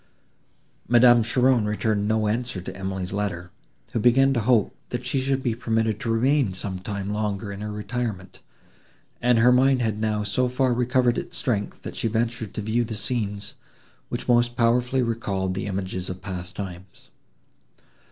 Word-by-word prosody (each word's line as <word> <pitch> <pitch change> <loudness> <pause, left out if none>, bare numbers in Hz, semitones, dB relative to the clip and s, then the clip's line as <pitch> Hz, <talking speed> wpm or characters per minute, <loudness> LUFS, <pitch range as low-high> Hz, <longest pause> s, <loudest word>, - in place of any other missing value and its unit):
Madame 120 0 +6
Cheron 125 0 +3
returned 105 -1 0
no 110 0 +1
answer 120 -1 -1
to 90 +1 -7
Emily's 95 -1 -4
letter, 90 -4 -3 0.4
who - - -1
began 135 +4 +4
to 120 - +1
hope, 115 -2 +2
that 125 0 -4
she 130 +2 0
should 135 0 0
be 120 - +1
permitted 110 -2 0
to 115 - -4
remain 125 -1 +2
some 95 0 -5
time 100 +1 -4
longer 105 -1 -2
in 100 0 -7
her 105 0 -4
retirement, 105 -2 -4 0.8
and 120 0 +4
her 120 +2 +6
mind 130 +1 +4
had 110 -2 -1
now 105 -1 0
so 125 +5 0
far 125 0 +1
recovered 125 0 +2
its - - -7
strength, 105 -5 -2
that - - -7
she - - -1
ventured 115 -1 -2
to 105 - -3
view 110 +3 +1
the 110 -1 -5
scenes, 105 -2 -3 0.6
which - - -4
most 120 -1 +3
powerfully 125 +2 +2
recalled 100 -5 -2
the 95 +2 -3
images 95 -2 -3
of 90 0 -5
past 90 -2 -6
times. 95 -1 -9
110 Hz, 170 wpm, -24 LUFS, 100-120 Hz, 0.8 s, Madame